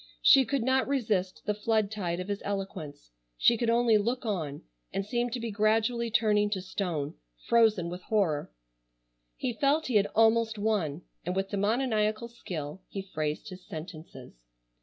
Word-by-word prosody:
She 270 Hz, -, +7 dB
could 275 Hz, -1 st, -1 dB
not 260 Hz, +1 st, +2 dB
resist 215 Hz, -9 st, -1 dB
the 210 Hz, -, +1 dB
flood 215 Hz, 0 st, 0 dB
tide 180 Hz, -5 st, -2 dB
of 185 Hz, -, -4 dB
his 205 Hz, -1 st, -3 dB
eloquence. 175 Hz, -, -5 dB, 0.3 s
She 235 Hz, -, +5 dB
could 235 Hz, 0 st, 0 dB
only 230 Hz, -2 st, +4 dB
look 240 Hz, +4 st, -1 dB
on 160 Hz, -10 st, -3 dB, 0.3 s
and 195 Hz, -, -2 dB
seem 240 Hz, +3 st, -1 dB
to 245 Hz, +1 st, -4 dB
be 230 Hz, -1 st, -4 dB
gradually 225 Hz, +3 st, +1 dB
turning 210 Hz, -2 st, +3 dB
to 190 Hz, -, -2 dB
stone—frozen 175 Hz, -, 0 dB
with 180 Hz, +1 st, -6 dB
horror. 180 Hz, -9 st, 0 dB, 0.8 s
He 250 Hz, -, -2 dB
felt 285 Hz, +6 st, +2 dB
he 245 Hz, -5 st, +2 dB
had 205 Hz, -, +3 dB
almost 225 Hz, 0 st, +4 dB
won, 190 Hz, -7 st, -1 dB, 0.2 s
and 180 Hz, +2 st, -2 dB
with 195 Hz, 0 st, -1 dB
demoniacal 215 Hz, +1 st, 0 dB
skill 175 Hz, -7 st, -6 dB
he 195 Hz, -, -5 dB
phrased 155 Hz, +6 st, -2 dB
his 185 Hz, -1 st, -10 dB
sentences. 155 Hz, -, -10 dB
210 Hz, 160 wpm, -29 LUFS, 180-230 Hz, 0.8 s, She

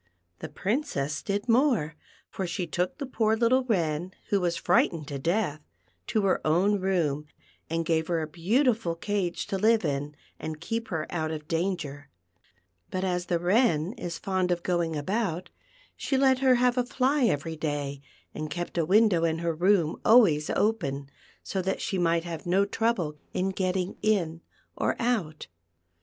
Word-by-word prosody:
The -, -, -6 dB
Princess 185 Hz, -, -2 dB
did 205 Hz, +2 st, -2 dB
more; 230 Hz, -, +2 dB, 0.3 s
for 190 Hz, -, -4 dB
she 175 Hz, +1 st, -2 dB
took 180 Hz, +1 st, -2 dB
the 280 Hz, -, -4 dB
poor 220 Hz, -4 st, +1 dB
little 240 Hz, +3 st, +3 dB
VWen, 175 Hz, -6 st, -1 dB, 0.2 s
who 200 Hz, -2 st, +2 dB
was 175 Hz, -1 st, 0 dB
frightened 165 Hz, -3 st, +2 dB
to 140 Hz, -1 st, -4 dB
death, 170 Hz, -1 st, 0 dB, 0.5 s
to 215 Hz, -, +1 dB
her 195 Hz, -, +2 dB
own 190 Hz, +6 st, +2 dB
room, 160 Hz, -6 st, 0 dB, 0.4 s
and 165 Hz, 0 st, -1 dB
gave 160 Hz, -1 st, +1 dB
her 170 Hz, -2 st, 0 dB
a 160 Hz, -, -2 dB
beautiful 210 Hz, -, +1 dB
cage 190 Hz, 0 st, -2 dB
to 195 Hz, -, -3 dB
live 220 Hz, -1 st, +3 dB
in, 145 Hz, 0 st, -2 dB, 0.2 s
and 155 Hz, -1 st, -5 dB
keep 225 Hz, +7 st, -3 dB
her 160 Hz, -5 st, -2 dB
out 160 Hz, -2 st, -1 dB
of 155 Hz, -1 st, -6 dB
danger; 165 Hz, -5 st, -2 dB, 0.8 s
but 185 Hz, 0 st, -2 dB
as 180 Hz, -1 st, -1 dB
the 170 Hz, -, +1 dB
Wren 180 Hz, -1 st, +2 dB
is 170 Hz, -6 st, -5 dB
fond 185 Hz, -2 st, -1 dB
of 175 Hz, -1 st, 0 dB
going 170 Hz, -3 st, 0 dB
about, 185 Hz, +2 st, -2 dB, 0.4 s
she 270 Hz, -, -1 dB
let 265 Hz, -1 st, +4 dB
her 260 Hz, -1 st, +5 dB
have 250 Hz, +1 st, +2 dB
a -, -, +3 dB
fly 260 Hz, +2 st, +1 dB
every 160 Hz, -4 st, 0 dB
day, 145 Hz, -3 st, -3 dB, 0.3 s
and 155 Hz, 0 st, -5 dB
kept 175 Hz, +1 st, -3 dB
a 165 Hz, -, +2 dB
window 195 Hz, -2 st, +4 dB
in 160 Hz, -1 st, +1 dB
her 170 Hz, 0 st, -1 dB
room 175 Hz, -1 st, +2 dB
alwa\ 220 Hz, -9 st, +7 dB
s 150 Hz, +1 st, -5 dB
open, 145 Hz, -11 st, -1 dB, 0.3 s
so 190 Hz, -, -2 dB
that 190 Hz, +1 st, -2 dB
she 190 Hz, -, -2 dB
might 170 Hz, -1 st, +2 dB
have 170 Hz, -1 st, -6 dB
no 190 Hz, +3 st, +3 dB
trouble 200 Hz, -9 st, -1 dB, 0.2 s
in 185 Hz, +1 st, +1 dB
getting 185 Hz, -1 st, -1 dB
in 170 Hz, -7 st, +1 dB, 0.3 s
or -, -, 0 dB
out. 215 Hz, -11 st, -1 dB
180 Hz, 170 wpm, -27 LUFS, 160-215 Hz, 0.8 s, alwa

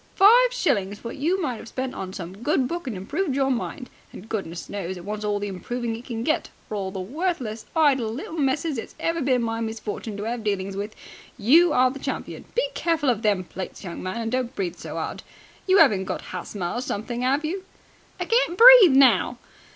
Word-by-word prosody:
Five 480 Hz, +5 st, +7 dB
shillings 210 Hz, -, -1 dB
what 230 Hz, -, -6 dB
you 335 Hz, +7 st, +1 dB
might 260 Hz, -9 st, -2 dB
have -, -, -10 dB
spent 260 Hz, +2 st, -4 dB
on 185 Hz, -1 st, -6 dB
some 185 Hz, 0 st, -7 dB
good 265 Hz, 0 st, +1 dB
book 340 Hz, -2 st, -5 dB
and 225 Hz, -6 st, -3 dB
improved 285 Hz, -, -2 dB
your 270 Hz, -1 st, +2 dB
mind! 250 Hz, +1 st, -3 dB, 0.2 s
And 210 Hz, -, -11 dB
goodness 180 Hz, -6 st, -4 dB
knows 190 Hz, -2 st, -5 dB
it 175 Hz, -, -10 dB
wants 210 Hz, +1 st, -4 dB
all 210 Hz, -1 st, 0 dB
the 205 Hz, 0 st, -3 dB
improving 225 Hz, +5 st, -4 dB
it 235 Hz, +2 st, -10 dB
can 230 Hz, -3 st, -4 dB
get, 310 Hz, -, 0 dB, 0.2 s
for -, -, -7 dB
of 210 Hz, -, -1 dB
all 190 Hz, 0 st, -4 dB
the 190 Hz, -, -5 dB
worthless, 245 Hz, -, -3 dB
idle 270 Hz, -8 st, +3 dB
little 270 Hz, +7 st, -6 dB
messers 285 Hz, -2 st, 0 dB
it's -, -, -9 dB
ever 330 Hz, 0 st, -1 dB
been 255 Hz, -3 st, +2 dB
my 225 Hz, 0 st, -2 dB
misfortune 220 Hz, -1 st, -5 dB
to 205 Hz, -, -4 dB
have 230 Hz, +1 st, -3 dB
dealings 195 Hz, -2 st, -2 dB
with, 205 Hz, +2 st, -5 dB, 0.4 s
you 310 Hz, +10 st, +5 dB
are 255 Hz, -2 st, +4 dB
the 275 Hz, -, -8 dB
champion. -, -, -5 dB
Be -, -, +2 dB
careful 325 Hz, -5 st, 0 dB
of 225 Hz, -3 st, -2 dB
them 205 Hz, -4 st, +1 dB
plates, 185 Hz, +3 st, -8 dB
young 175 Hz, -3 st, -6 dB
man, 185 Hz, +5 st, -4 dB
and 225 Hz, 0 st, -3 dB
don't 255 Hz, 0 st, -2 dB
breathe 180 Hz, -3 st, -3 dB
so -, -, -8 dB
hard. -, -, -4 dB, 0.5 s
You 375 Hz, +1 st, +5 dB
'aven't 205 Hz, -12 st, +5 dB
got -, -, -5 dB
hasthma 180 Hz, 0 st, -4 dB
or 240 Hz, -, -2 dB
something, 240 Hz, +1 st, -4 dB
'ave 280 Hz, +4 st, +1 dB
you?" 375 Hz, +4 st, -4 dB, 0.6 s
"I -, -, -2 dB
can't 460 Hz, -7 st, +2 dB
breathe 470 Hz, -, +10 dB
now!" 270 Hz, -2 st, +5 dB
240 Hz, 215 wpm, -24 LUFS, 205-300 Hz, 0.6 s, breathe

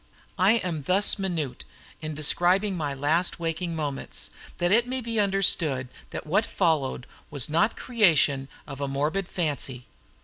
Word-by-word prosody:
I 190 Hz, +4 st, +5 dB
am 180 Hz, -9 st, -1 dB
thus 190 Hz, +8 st, +3 dB
minute 165 Hz, -9 st, -3 dB, 0.4 s
in 155 Hz, -1 st, -5 dB
describing 180 Hz, +6 st, +3 dB
my 145 Hz, -5 st, -3 dB
last 160 Hz, +7 st, +1 dB
waking 170 Hz, +1 st, -3 dB
moments, 145 Hz, -3 st, -4 dB, 0.3 s
that 175 Hz, +1 st, 0 dB
it 235 Hz, +3 st, +4 dB
may 260 Hz, +1 st, -2 dB
be 230 Hz, -2 st, -3 dB
understood 170 Hz, -10 st, +2 dB, 0.2 s
that -, -, -7 dB
what 180 Hz, +8 st, +2 dB
followed 155 Hz, -11 st, 0 dB, 0.2 s
was 140 Hz, -3 st, +3 dB
not 170 Hz, +8 st, +2 dB
creation 160 Hz, -, +2 dB, 0.2 s
of 140 Hz, -1 st, -9 dB
a 140 Hz, -, -1 dB
morbid 150 Hz, +8 st, -2 dB
fancy. 140 Hz, -7 st, -2 dB
165 Hz, 145 wpm, -26 LUFS, 145-195 Hz, 0.4 s, I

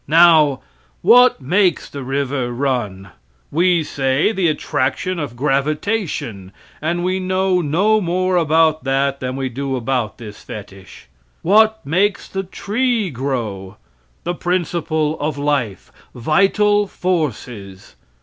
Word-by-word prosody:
Now, 155 Hz, -3 st, +5 dB, 0.4 s
what 250 Hz, -, +6 dB
makes 180 Hz, +5 st, +1 dB
the 140 Hz, -1 st, -7 dB
river 135 Hz, -1 st, -2 dB
run? 120 Hz, -7 st, -2 dB, 0.4 s
We 175 Hz, +1 st, +2 dB
say 135 Hz, +5 st, 0 dB
the 190 Hz, -5 st, 0 dB
attraction 150 Hz, +3 st, -1 dB
of 145 Hz, -6 st, -5 dB
gravitation, 140 Hz, -, -2 dB, 0.3 s
and 170 Hz, +3 st, -1 dB
we 185 Hz, +1 st, 0 dB
know 185 Hz, 0 st, +1 dB
no 195 Hz, +8 st, +2 dB
more 185 Hz, +1 st, 0 dB
about 160 Hz, -1 st, +3 dB
that 135 Hz, +1 st, 0 dB
than 130 Hz, 0 st, -4 dB
we 135 Hz, -1 st, -2 dB
do 135 Hz, +2 st, -3 dB
about 125 Hz, -3 st, -2 dB
this 105 Hz, -3 st, -10 dB
fetich. 95 Hz, -2 st, -11 dB, 0.4 s
What 220 Hz, +4 st, +3 dB
makes 190 Hz, +7 st, 0 dB
the 195 Hz, -, -3 dB
tree 215 Hz, +2 st, -1 dB
grow? 115 Hz, -7 st, -4 dB, 0.5 s
The 175 Hz, -, -2 dB
principle 165 Hz, -3 st, -1 dB
of 150 Hz, 0 st, -2 dB
life 140 Hz, -9 st, -2 dB, 0.2 s
vital 200 Hz, -, +2 dB
forces. 125 Hz, -, -4 dB
150 Hz, 120 wpm, -19 LUFS, 130-185 Hz, 0.5 s, what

